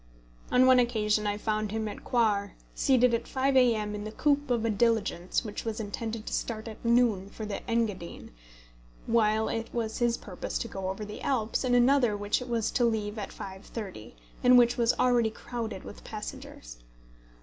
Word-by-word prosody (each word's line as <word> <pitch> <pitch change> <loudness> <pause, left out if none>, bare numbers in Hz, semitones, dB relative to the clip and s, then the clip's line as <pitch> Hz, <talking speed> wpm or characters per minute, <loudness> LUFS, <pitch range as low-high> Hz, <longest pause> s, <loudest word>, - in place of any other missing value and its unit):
On 255 +1 +5
one 255 -1 +7
occasion 215 -3 +1
I 205 0 -1
found 215 0 -1
him 220 0 -2
at 205 - -7
Coire 210 -4 +1 0.2
seated 250 -2 +3
at 230 - -1
5 265 +1 0
A.M. 225 -5 +3
in 205 0 -5
the 215 - -6
coupé 285 +3 +1
of 235 -2 +1
a 225 - +2
diligence 215 -3 0
which 210 -1 -5
was 225 -1 -3
intended 220 +1 -4
to - - -5
start 220 -1 -3
at 220 - -9
noon 230 -5 +2
for 215 +1 -7
the 205 -1 -4
Engadine, 215 -7 -2 0.7
while 220 -1 +2
it 225 0 -3
was 225 -1 -3
his 240 -1 +2
purpose 185 -4 -5
to - - -3
go 195 -3 -4
over 195 +3 -4
the 210 0 -8
Alps 230 -4 0
in 250 -1 +2
another 245 -3 +4
which 205 0 0
was 235 -3 -1
to 245 - +1
leave 220 -2 0
at 200 - -5
5.30, 190 - -8 0.3
and 250 0 +7
which 240 -1 +5
was 235 -1 +3
already 240 -3 +3
crowded 220 -2 -6
with - - -11
passengers. - - -8
225 Hz, 185 wpm, -29 LUFS, 210-240 Hz, 0.7 s, one